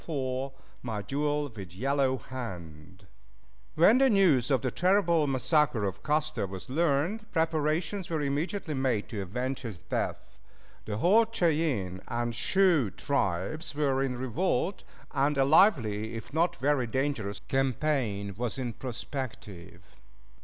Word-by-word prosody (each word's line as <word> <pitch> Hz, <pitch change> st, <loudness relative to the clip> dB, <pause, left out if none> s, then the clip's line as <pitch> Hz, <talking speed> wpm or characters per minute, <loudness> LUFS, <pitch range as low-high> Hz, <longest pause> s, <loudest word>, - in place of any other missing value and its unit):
IV 135 Hz, -2 st, -2 dB, 0.3 s
MY 110 Hz, -4 st, -4 dB
DUEL 145 Hz, +4 st, -1 dB
WITH 95 Hz, -7 st, -9 dB
YELLOW 135 Hz, +3 st, +1 dB
HAND 95 Hz, -8 st, -8 dB, 0.7 s
When 210 Hz, +10 st, +6 dB
the 270 Hz, 0 st, +5 dB
news 180 Hz, -, +4 dB
of 135 Hz, -4 st, +2 dB
the 130 Hz, -, 0 dB
terrible 175 Hz, -, +3 dB
massacre 135 Hz, -3 st, +2 dB
of 95 Hz, -, -4 dB
Custer 150 Hz, -7 st, 0 dB
was 95 Hz, +5 st, -8 dB
learned, 170 Hz, +8 st, 0 dB
preparations 160 Hz, +3 st, 0 dB
were 160 Hz, -3 st, -1 dB
immediately 155 Hz, +5 st, -2 dB
made 130 Hz, -6 st, 0 dB
to 105 Hz, -4 st, -4 dB
avenge 125 Hz, +8 st, -3 dB
his 115 Hz, -8 st, -7 dB
death. 85 Hz, -, -4 dB, 0.5 s
The 105 Hz, -1 st, -3 dB
whole 215 Hz, -, +4 dB
Cheyenne 150 Hz, -, 0 dB
and 120 Hz, 0 st, -2 dB
Sioux 155 Hz, -, +3 dB
tribes 140 Hz, -, -2 dB
were 140 Hz, -3 st, +1 dB
in 130 Hz, -2 st, -1 dB
revolt, 130 Hz, -, -1 dB, 0.3 s
and 140 Hz, +1 st, +1 dB
a 135 Hz, -, +4 dB
lively, 115 Hz, -, +3 dB
if 115 Hz, +4 st, -8 dB
not 165 Hz, +3 st, +2 dB
very 135 Hz, -2 st, +1 dB
dangerous, 120 Hz, -6 st, -2 dB
campaign 130 Hz, -7 st, 0 dB
was 120 Hz, 0 st, -3 dB
in 125 Hz, -3 st, -3 dB
prospective. 110 Hz, -, -7 dB
135 Hz, 130 wpm, -29 LUFS, 110-155 Hz, 0.7 s, When